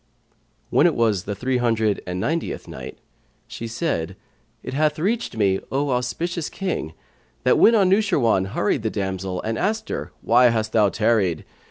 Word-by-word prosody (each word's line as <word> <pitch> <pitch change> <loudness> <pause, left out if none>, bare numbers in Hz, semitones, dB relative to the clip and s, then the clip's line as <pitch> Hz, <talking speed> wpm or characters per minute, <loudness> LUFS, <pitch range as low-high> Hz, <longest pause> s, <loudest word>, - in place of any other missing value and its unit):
When - - +5
it - - 0
was 110 -5 +1
the 100 - -3
Three 125 +5 -1
hundred 110 -4 +1
and 90 0 -3
Ninetieth 165 - -2
Night - - -8 0.5
She 115 - -7
said, 115 - -2 0.5
It - - -6
hath 150 +1 +1
reached 205 - -1
me, 95 -3 +2
O 140 +1 0
auspicious 150 +7 -2
King, 180 - -3 0.5
that - - +4
when 230 - +6
Anushirwan 190 - +3
hurried 105 +2 0
the 110 - -1
damsel 95 -2 -3
and 110 +1 -2
asked 220 +3 -1
her, - - -4
"Why 120 +2 +5
hast 110 -1 -1
thou 105 -3 +4
tarried?" 105 -6 +1
115 Hz, 160 wpm, -22 LUFS, 100-155 Hz, 0.5 s, when